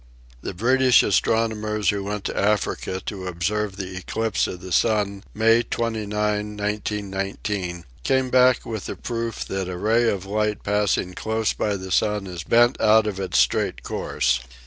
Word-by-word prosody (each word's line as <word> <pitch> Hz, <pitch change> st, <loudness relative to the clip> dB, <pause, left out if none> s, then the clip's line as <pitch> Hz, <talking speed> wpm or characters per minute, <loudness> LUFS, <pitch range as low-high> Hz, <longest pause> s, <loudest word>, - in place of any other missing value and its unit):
The 95 Hz, -, -5 dB
British 130 Hz, +4 st, +4 dB
astrono 110 Hz, +3 st, +2 dB
mers 105 Hz, -2 st, 0 dB
who 100 Hz, -1 st, -3 dB
went 105 Hz, 0 st, -4 dB
to -, -, -3 dB
Africa 100 Hz, -2 st, 0 dB
to 95 Hz, -3 st, -5 dB
observe 95 Hz, +4 st, -2 dB
the 95 Hz, -2 st, -6 dB
eclipse 110 Hz, +4 st, -1 dB
of 90 Hz, -, -6 dB
the 95 Hz, 0 st, -9 dB
sun 100 Hz, 0 st, +1 dB
May 115 Hz, +2 st, +4 dB
29, 115 Hz, -3 st, -3 dB, 0.5 s
1919, 100 Hz, -3 st, -3 dB, 0.2 s
came 130 Hz, -1 st, +1 dB
back 130 Hz, -1 st, +4 dB
with 110 Hz, -3 st, -5 dB
the -, -, -4 dB
proof 115 Hz, -2 st, -4 dB
that 95 Hz, -1 st, -3 dB
a 90 Hz, -, -4 dB
ray 115 Hz, +4 st, +2 dB
of 95 Hz, -2 st, -2 dB
light 105 Hz, +1 st, -1 dB
passing 100 Hz, -3 st, 0 dB
close 110 Hz, +2 st, -1 dB
by 105 Hz, -1 st, -1 dB
the 95 Hz, -1 st, -7 dB
sun 105 Hz, +1 st, +1 dB
is 90 Hz, -3 st, -6 dB
bent 120 Hz, +7 st, +3 dB
out 110 Hz, 0 st, +5 dB
of 100 Hz, -3 st, -3 dB
its 95 Hz, -, -1 dB
straight -, -, +1 dB
course. 65 Hz, -, 0 dB
105 Hz, 165 wpm, -23 LUFS, 95-110 Hz, 0.5 s, out